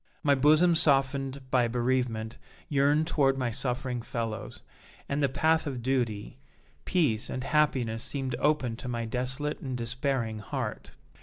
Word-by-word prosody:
My 145 -2 +4
bosom 155 +6 +5
softened 135 -3 +1
by 125 -2 +3
bereavement 120 -2 -1 0.3
yearned 145 +2 +3
toward 135 -4 +2
my 125 -3 -1
suffering 125 +1 -2
fellows, 115 -2 -5 0.4
and 140 +1 -1
the 140 - +3
path 160 +3 +2
of 130 -4 -4
duty, 115 - -1 0.5
peace 140 -12 +1
and 130 - -4
happiness 130 -6 +1
seemed 135 -3 0
open 140 -6 +1
to 130 - -7
my 120 -1 -2
desolate 130 +5 -2
and 130 -2 -4
despairing 120 -2 -2
heart. 105 - -5
130 Hz, 140 wpm, -28 LUFS, 120-140 Hz, 0.5 s, bosom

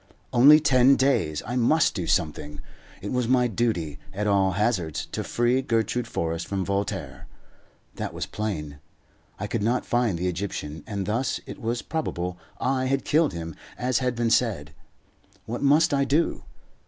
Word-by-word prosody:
Only 145 +5 +8
ten 135 -3 +5
days! 130 - +1
I 120 - -4
must 135 +6 +3
do 90 -4 -3
something. 75 -3 -1 0.4
It 100 - -4
was 125 -2 0
my 125 0 +3
duty, 95 -10 -1 0.2
at 105 +1 -1
all 100 -2 +3
hazards, 95 -6 0
to - - -3
free 120 +2 +1
Gertrude 120 -1 0
Forrest 85 -5 -3
from 95 -2 -2
Voltaire. 100 -8 -3 0.7
That - - -3
was - - -4
plain. 75 -9 -4 0.6
I 105 - -4
could 105 +1 -2
not 120 +4 0
find 120 -7 +1
the 90 +2 -1
Egyptian, 85 -5 -4
and 100 -2 -3
thus 115 +6 -1
it - - -9
was 115 +1 -2
probable 90 - -3 0.2
I 130 0 0
had 135 +1 0
killed 155 0 +2
him 85 -1 -5 0.2
as 125 -1 +1
had 125 -2 -1
been 115 -1 0
said. 95 -12 +1 0.7
What 120 +2 -4
must 145 +3 +4
I 140 0 +3
do? 150 +5 0
115 Hz, 165 wpm, -25 LUFS, 90-125 Hz, 0.7 s, Only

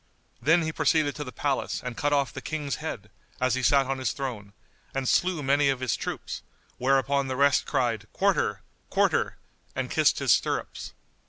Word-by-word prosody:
Then 165 +3 +4
he 160 - -1
proceeded 155 -2 +2
to 150 - -4
the 125 - -8
palace 140 0 -1
and 125 -2 -4
cut 145 +4 0
off 140 -2 +1
the 135 - -6
King's 150 -2 -3
head, 105 -10 -6 0.3
as 130 0 +2
he 130 - 0
sat 135 +1 +4
on 135 0 -2
his 130 - -1
throne, 120 -8 -5 0.4
and 135 -1 -1
slew 175 -1 +2
many 140 +1 +3
of 135 -2 0
his 125 -4 0
troops, - - -5 0.4
whereupon 135 +1 +2
the 130 - -2
rest 140 0 +3
cried 120 -6 0
"Quarter! - - +1 0.3
Quarter!" - - +1 0.4
and - - -3
kissed - - +3
his - - +2
stirrups. - - 0
135 Hz, 180 wpm, -27 LUFS, 130-145 Hz, 0.4 s, Then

